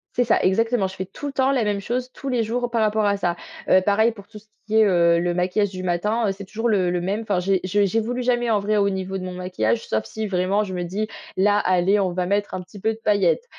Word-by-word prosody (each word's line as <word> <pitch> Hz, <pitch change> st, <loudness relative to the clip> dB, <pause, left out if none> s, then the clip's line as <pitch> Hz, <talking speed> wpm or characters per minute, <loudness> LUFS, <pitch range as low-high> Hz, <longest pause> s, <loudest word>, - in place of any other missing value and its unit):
C'est 245 Hz, -, +3 dB
ça 240 Hz, -, +2 dB
exactement, 225 Hz, +2 st, +2 dB
je 190 Hz, -, -10 dB
fais 190 Hz, -, -4 dB
tout 195 Hz, +10 st, -8 dB
le 280 Hz, -, -5 dB
temps 265 Hz, 0 st, +2 dB
la 260 Hz, -4 st, +1 dB
même 205 Hz, -1 st, 0 dB
chose 250 Hz, +5 st, -3 dB
tous 275 Hz, -, -9 dB
les 245 Hz, -3 st, +1 dB
jours 240 Hz, +2 st, -2 dB
par 230 Hz, -1 st, +1 dB
rapport 215 Hz, 0 st, +2 dB
à 200 Hz, 0 st, +2 dB
ça. 175 Hz, -3 st, -1 dB, 0.3 s
Heu, 185 Hz, -, +6 dB
pareil 210 Hz, +4 st, +3 dB
pour 200 Hz, -3 st, -13 dB
tout 215 Hz, -2 st, -11 dB
ce 210 Hz, -, -25 dB, 0.2 s
qui 220 Hz, 0 st, 0 dB
est, 220 Hz, -, +7 dB
heu, 170 Hz, -3 st, +4 dB
le 175 Hz, 0 st, 0 dB
maquillage 185 Hz, +3 st, +1 dB
du 185 Hz, -1 st, -7 dB
matin, 210 Hz, +6 st, 0 dB
heu, -, -, +1 dB
c'est 200 Hz, +1 st, -8 dB
toujours 225 Hz, +4 st, -2 dB
le 190 Hz, -5 st, +2 dB
le 175 Hz, 0 st, -1 dB
même. 195 Hz, +5 st, -2 dB
Enfin 205 Hz, -4 st, 0 dB
j'é 190 Hz, +1 st, +1 dB
je 200 Hz, +2 st, +2 dB
j'évolue 225 Hz, +5 st, -1 dB
jamais 240 Hz, -1 st, +1 dB
en 215 Hz, -2 st, +3 dB
vrai 210 Hz, +1 st, 0 dB
au 200 Hz, -1 st, +3 dB
niveau 190 Hz, 0 st, -3 dB
de -, -, -7 dB
mon 185 Hz, 0 st, -5 dB
maquillage, 180 Hz, -12 st, -1 dB
sauf 110 Hz, 0 st, -1 dB
si 220 Hz, -, -5 dB
vraiment 195 Hz, +1 st, +1 dB
je 190 Hz, -3 st, -6 dB
me 180 Hz, -1 st, -2 dB
dis: 200 Hz, +5 st, -3 dB, 0.3 s
«Là 205 Hz, +2 st, +3 dB
allez, 185 Hz, +2 st, +2 dB
on 185 Hz, -3 st, 0 dB
va 180 Hz, 0 st, -1 dB
mettre 200 Hz, +2 st, -1 dB
un 185 Hz, -, -4 dB
petit 205 Hz, +3 st, -13 dB
peu 220 Hz, +3 st, 0 dB
de 220 Hz, -, -13 dB
paillettes». 205 Hz, -, +2 dB
200 Hz, 285 wpm, -22 LUFS, 185-220 Hz, 0.3 s, est